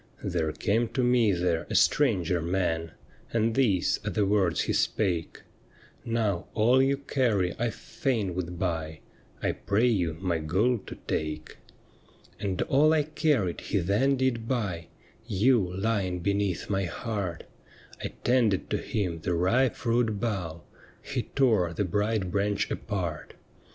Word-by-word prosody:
' - - -25
There 80 -3 -1
came 115 +7 0
to 130 - +2
me 120 -3 +4
there 85 -2 0
a - - -3
stranger 90 - +3
man, 85 -2 -1 0.4
And 115 0 +1
these 110 -9 +2
are - - -2
the 105 - +1
words 95 -4 +2
he - - -1
spake: 90 -6 0 0.3
" - - -26 0.2
Now, 110 -6 -1
all 120 +5 +4
you 135 +1 +2
carry 120 -10 0
I 120 +1 +1
fain 110 -5 -2
would 90 -1 -4
buy, 80 -3 -3 0.4
I - - +2
pray 105 +4 0
you 90 -9 +1
my 90 -3 0
gold 100 +8 0
to - - -7
take." 75 0 -3 0.4
' - - -29
And 95 -3 -2
all 150 +3 +4
I 155 -2 +3
carried 145 - 0
he - - -1
then 105 +10 +2
did 125 -3 0
buy 100 -10 -2 0.2
— 110 - -31 0.2
You 115 -8 +4
lying 95 -2 -1
beneath 100 -1 0
my 95 -1 0
heart 95 -1 -4 0.3
— - - -20
I - - 0 0.2
tended 120 -6 +2
to - - +2
him 90 -6 -2
the 90 +1 -1
ripe 115 +10 +2
fruit 115 -3 0
bough. 90 -8 -3 0.4
He - - -3
tore 110 -11 +3
the 100 - -1
bright 105 0 0
branch 100 +1 0
apart. 90 -7 -4
100 Hz, 155 wpm, -28 LUFS, 90-115 Hz, 0.4 s, me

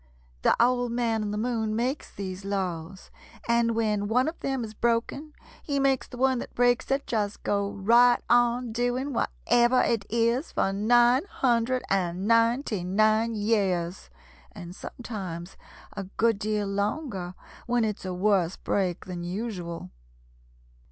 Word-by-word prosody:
The - - +4
Old 245 0 +2
Man 230 -2 0
in 210 - -2
the 210 - -3
Moon 220 -1 -1
makes 255 +5 -2
these 190 -1 -6
laws, 190 -2 -4 0.4
and 235 -1 +2
when 210 -2 0
one 250 +5 +2
of 320 - -4
them 270 -3 -2
is 215 -1 -7
broken 235 +7 -1 0.3
he 280 -2 -2
makes 270 -2 +1
the 250 - -10
one 260 0 +2
that - - -8
breaks 245 0 +2
it 270 +1 0
just 210 -3 -2
go 200 0 0
right 235 +5 +4
on 240 0 +2
doing 245 +4 -1
whatever 240 - +2
it 225 -4 0
is 235 +6 0
for 195 - +1
nine 240 - +4
hundred 250 0 +1
and 185 0 -1
ninety 230 -2 +2
nine 215 +4 +2
years, 195 -5 0 0.4
and 180 -4 -9
sometimes 190 -8 -7 0.4
a 200 -1 -4
good 220 +2 0
deal 210 -1 -1
longer 200 - -3 0.3
when 240 -1 +2
it's 210 -2 -3
a 185 - -4
worse 185 -1 +1
break 185 -3 -1
than 180 -2 -6
usual. 175 - -5
220 Hz, 145 wpm, -27 LUFS, 195-245 Hz, 0.4 s, The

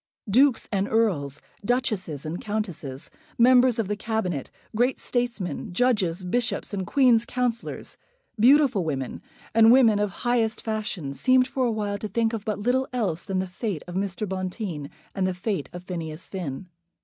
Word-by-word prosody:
Dukes 255 +5 +4
and 200 -1 0
Earls, 170 -12 0 0.2
Duchesses 200 - -1
and 160 +3 -4
Countesses, 195 - -4 0.3
Members 250 0 +5
of 225 -4 0
the 210 - -1
Cabinet, 205 - -2 0.3
great 245 +4 +2
statesmen, 235 - -2
Judges, 195 -6 +1
Bishops, 240 +3 -1
and 190 -2 -3
Queen's 245 -2 +4
Counsellors, 245 -1 -3 0.4
beautiful 255 -4 +5
women, 135 -5 -3 0.3
and 225 0 +7
women 235 -5 +6
of 210 0 +1 0.2
highest 230 -2 +1
fashion, 210 -10 -3
seemed 255 - +3
for 260 -2 0
a - - +1
while 205 -2 -2
to 215 - -4
think 225 +2 0
of 220 -1 -4
but 215 -3 -1
little 250 +5 +1
else 195 -10 -1
than 190 - -3
the 185 0 -1
fate 185 - -4
of 175 - -7
Mr. 195 +2 -2
Bonteen 185 -5 -4 0.2
and 190 -1 0
the 185 - -2
fate 190 -4 -3
of 175 0 -8
Phineas 165 -2 -5
Finn. 180 -3 -5
210 Hz, 160 wpm, -25 LUFS, 180-235 Hz, 0.4 s, and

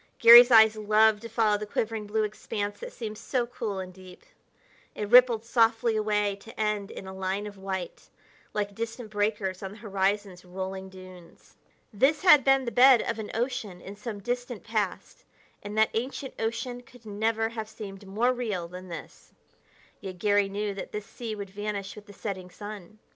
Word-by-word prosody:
Garry's 240 +1 +10
eyes 220 -2 +7
loved 215 0 +3
to 230 - -8
follow 215 -2 +2
the 210 - -6
quivering 220 0 -3
blue 215 +1 0
expanse 205 -1 -4
that - - -7
seemed 215 - -7
so 250 -3 -1
cool 230 -4 -5
and 185 -1 -6
deep. 185 0 -14 0.7
It 210 -1 -4
rippled 245 -2 +6
softly 230 -1 +2
away 210 -2 0
to 220 +3 -14
end 210 -2 -1
in - - -9
a 190 - -8
line 190 +2 -3
of 205 -1 -8
white, 190 -2 -6 0.4
like 205 -1 -2
distant 225 +1 -6
breakers 205 -3 -1
on 195 0 -6
the - - -13
horizon's 200 -3 -2
rolling 190 +1 -6
dunes. 185 -2 -15 0.4
This 275 - +2
had 300 -7 +8
been 270 0 +3
the 235 - -3
bed 255 0 +6
of 230 -1 -3
an 215 - -5
ocean 230 -6 -3
in 195 +3 -10
some 210 +1 -6
distant 245 +1 -4
past, 215 -4 -3 0.4
and 205 +1 -7
that 220 0 +4
ancient 260 +3 -4
ocean 230 +2 -3
could 245 -1 -19
never 220 +2 -1
have 220 -2 -6
seemed 200 -3 -9
more 230 +6 +1
real 210 -9 -3
than 180 +2 -10
this; 170 -2 -10 0.7
yet 185 -2 -8
Garry 205 +1 +2
knew 205 +1 -3
that 195 - -7
this 210 -1 -4
sea 225 -1 -6
would 200 -2 -7
vanish 205 -1 -5
with 210 0 -13
the - - -12
setting 190 -3 -6
sun. 205 0 -10
210 Hz, 180 wpm, -27 LUFS, 195-230 Hz, 0.7 s, Garry's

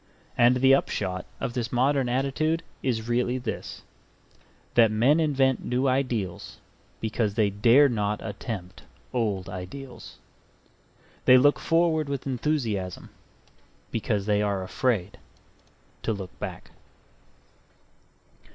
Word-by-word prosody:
And 120 +1 +5
the 130 +1 +5
upshot 95 -8 -1
of 120 - -3
this 120 -3 -3
modern 130 +1 +2
attitude 140 +6 0 0.2
is 115 -4 -1
really 125 +1 +1
this: 125 - -6 0.9
that 115 -2 +6
men 120 +9 +3
invent 135 -4 +2
new 125 +2 0
ideals 125 -9 -2 0.4
because 110 -2 -1
they 105 -3 +2
dare 120 +8 +5
not 105 -4 -1
attempt 100 -3 -6 0.3
old 105 -6 -1
ideals. 120 +9 -8 1.1
They 130 - +8
look 145 +3 +4
forward 165 -3 +1
with 140 -2 -3
enthusiasm, 120 - -2 0.8
because 105 -3 -1
they 105 -1 +2
are 100 -2 -1
afraid 105 -2 -1 0.8
to 110 - -1
look 95 -3 -7
back. - - -7
120 Hz, 110 wpm, -26 LUFS, 105-135 Hz, 1.1 s, They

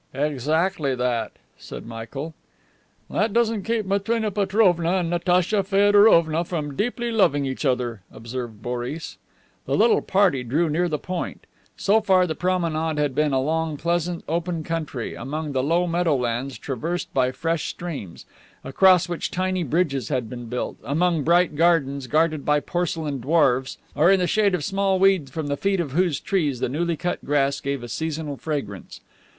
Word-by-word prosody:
"Exactly 150 +2 0
that," 125 -2 -1 0.3
said - - -9
Michael. 120 +7 -7 0.7
"That 215 0 0
doesn't 230 -3 +1
keep 225 +1 -1
Matrena 210 +3 0
Petrovna 190 -4 +2
and 175 -3 -1
Natacha 180 +3 +2
Feodorovna 195 -5 +4
from 155 -5 -4
deeply 240 - -2
loving 145 -11 +2
each 135 +3 -4
other," 125 -5 -1
observed 115 -2 -7
Boris. 125 +6 -5 0.5
The - - +1
little 435 -2 +4
party 190 -9 +2
drew 150 +7 0
near 175 +3 +1
the 150 - -1
"Point." 180 +3 -5 0.3
So 215 +3 +3
far 190 -3 +4
the 160 - -2
promenade 165 -2 -1
had 145 -2 0
been 150 +2 +1
along 155 +3 0
pleasant 170 +2 -1
open 170 0 -2
country, 155 -7 -4
among 150 +4 -4
the 130 -2 0
low 165 +6 +1
meadows 135 -7 -1
traversed 160 +7 -4
by 130 -1 +2
fresh 165 +3 -2
streams, 145 - -7 0.4
across 185 +6 +4
which 175 -1 -3
tiny 185 0 -1
bridges 145 -5 0
had 125 -3 -1
been 120 -1 -7
built, 125 +2 -4
among 165 +2 +1
bright 170 +1 +3
gardens 145 -5 +2
guarded 155 0 +1
by 150 0 +2
porcelain 160 -4 -2
dwarfs, 130 -2 +2 0.2
or 155 +5 +4
in 195 0 +5
the 180 - +1
shade 200 +1 +2
of 150 - -4
small 195 +2 +1
weeds 190 -7 +3
from 155 +3 -4
the 145 0 -1
feet 195 +5 0
of 160 -6 -2
whose 170 0 +1
trees 150 -10 -1
the - - 0
newly 165 +4 -1
cut 175 +2 -3
grass 140 -1 +1
gave 140 -2 -3
a - - -6
seasonal 155 +3 -3
fragrance. 140 - -5
160 Hz, 160 wpm, -23 LUFS, 140-180 Hz, 0.7 s, in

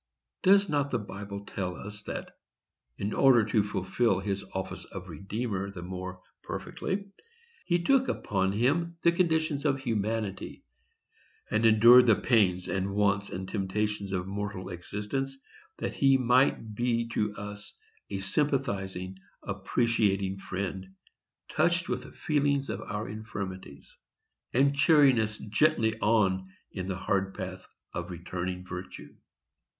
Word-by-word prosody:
Does 200 +1 +5
not 145 -4 0
the 125 - 0
Bible 100 -1 -7
tell 90 -3 -3
us 105 +4 -8
that, - - -6 0.6
in 100 +1 -2
order 125 -5 +5
to 110 -1 +2
fulfil 100 +1 +1
his 100 0 -2
office 95 - -4
of - - -9
Redeemer 100 -1 -3
the 95 -3 -8
more 95 0 -6 0.2
perfectly, 200 +1 -4 0.6
he 175 -1 +2
took 265 +4 +4
upon 95 -1 0
him 165 +10 +1
the 170 - +6
condition 160 -4 +1
of 135 -1 +2
humanity, 110 -4 -2 0.9
and 110 +1 +4
endured 115 +3 +8
the 110 - +7
pains, 95 -8 +2
and 95 +1 -1
wants, 100 -1 +2
and 95 +1 -5
temptations 100 0 -2
of 95 -2 0
a - - -9
mortal 100 -1 -4
existence, 105 +10 -4 0.4
that - - -3
he 135 -1 +4
might 125 -3 +2
be 115 +1 0
to 105 -2 -1
us 105 0 -8 0.3
a 100 - -3
sympathizing, 95 -6 -1 0.2
appreciating 100 -5 0
friend, 95 0 -5 0.5
"touched 175 +1 +2
with - - -1
the - - -12
feeling 145 -3 +1
of - - -3
our 105 +2 -4
infirmities," 100 -7 -7 0.6
and 140 +3 +3
cheering 140 -4 +6
us 110 -1 -1
gently 110 0 +2
on 95 -4 +2 0.2
in 95 -2 -5
the 95 -2 -2
hard 95 0 -1
path 95 -2 -6 0.3
of - - -4
returning 90 +1 -4
virtue? 90 +1 -8
105 Hz, 135 wpm, -29 LUFS, 95-125 Hz, 0.9 s, endured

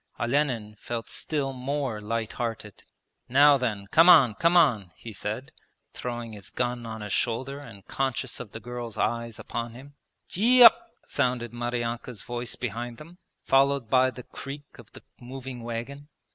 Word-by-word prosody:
Olenin 120 -4 0
felt 115 -1 -5
still 140 -3 -1
more 130 -3 -3
light 115 +1 -2
hearted. 115 -4 -5 0.5
'Now 140 +2 +6
then, 105 -6 -2
come 165 +3 +7
on, 140 -10 +8
come 170 - +3
on,' 115 - +4
he 115 - -10
said, 105 +6 -5 0.4
throwing 120 -2 -5
his 100 -2 -10
gun 120 -1 -2
on 110 -1 -6
his 105 -2 -4
shoulder 130 +4 -1
and 110 -9 -12
conscious 135 -2 -2
of 115 -4 -8
the 110 - -7
girl's 120 -2 -7
eyes 115 -1 -1
upon 115 -1 -5
him. 140 +3 -12 0.3
'Gee 245 +6 +5
up!' 240 +9 +8 0.2
sounded 120 -2 -1
Maryanka's 120 -1 -3
voice 120 0 -4
behind 120 0 -5
them, 170 +4 -13 0.3
followed 135 -3 +3
by 130 0 +5
the 125 0 -9
creak 140 +2 -9
of 115 - -14
the - - -13 0.2
moving 130 0 -8
wagon. 120 +5 -6
120 Hz, 160 wpm, -27 LUFS, 115-135 Hz, 0.5 s, on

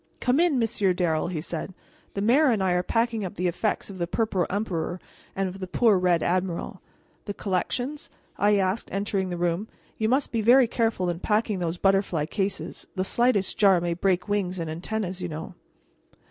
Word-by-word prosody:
"Come 250 +3 +2
in, 340 -5 +3
Monsieur 215 -5 +1
Darrel," 170 -4 0
he 170 -3 -3
said; 175 +3 -5 0.4
"the 200 - -1
mayor 270 +8 +5
and 215 -5 +1
I 185 - +2
are 180 0 +2
packing 230 +3 0
up 185 - -5
the 180 - -2
effects 180 +5 -1
of 195 -2 -9
the 170 - -1
Purple 195 -3 0
Emperor 185 -4 -2 0.4
and 195 0 0
of 185 +1 -7
the 185 - -5
poor 220 +2 +3
Red 180 -2 +2
Admiral." 180 -1 -2 0.4
"The 205 - -5
collections?" 245 +9 -2 0.3
I 205 0 +3
asked, 190 +3 0
entering 195 -1 -1
the 175 - -3
room. 175 +4 -1 0.3
"You 220 0 +1
must 265 +3 +1
be 230 - 0
very 245 +3 +6
careful 225 -6 0
in 170 - -6
packing 210 0 0
those 170 0 -2
butterfly 195 -5 +2
cases; 195 +3 -3
the 185 0 -1
slightest 235 -2 +1
jar 195 -4 +6
might 170 0 -3
break 185 -2 +1
wings 195 -3 -1
and 165 -2 -3
antennas, 185 +2 -3
you 180 - -2
know." 160 +3 -6
190 Hz, 190 wpm, -26 LUFS, 180-220 Hz, 0.4 s, very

